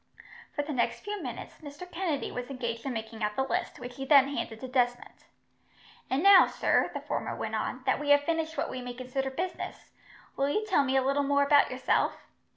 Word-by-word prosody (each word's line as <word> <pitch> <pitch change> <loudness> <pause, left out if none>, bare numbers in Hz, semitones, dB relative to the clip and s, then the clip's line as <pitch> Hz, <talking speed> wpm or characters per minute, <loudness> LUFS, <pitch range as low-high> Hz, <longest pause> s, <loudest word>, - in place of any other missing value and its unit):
For 290 - 0
the 295 +1 -4
next 235 -2 0
few 415 0 -5
minutes, - - -7
Mr. 290 +3 -9
Kennedy 335 -6 -2
was 250 0 -5
engaged 235 -2 -4
in 265 - -2
making 220 0 -6
out 210 0 -1
the 265 - +1
list, 265 - -2
which 245 0 -9
he 270 - -4
then 275 -1 +6
handed 225 -1 -4
to 260 - -5
Desmond. 245 -1 -1 0.8
"And 270 +5 0
now, 395 -1 +8
sir," - - +1
the - - -5
former - - -3
went - - -4
on, - - -3
"that - - +2
we 295 - -3
have 285 0 +7
finished 325 +1 -2
what - - -1
we 255 - -5
may 245 0 -6
consider 260 +2 -3
business, 345 +7 -5 0.4
will 275 +1 +1
you 425 +9 0
tell 370 -9 +3
me 270 0 +1
a 265 - +3
little 275 +2 +1
more 280 0 +2
about 285 0 +5
yourself? - - 0
275 Hz, 215 wpm, -29 LUFS, 250-295 Hz, 0.8 s, now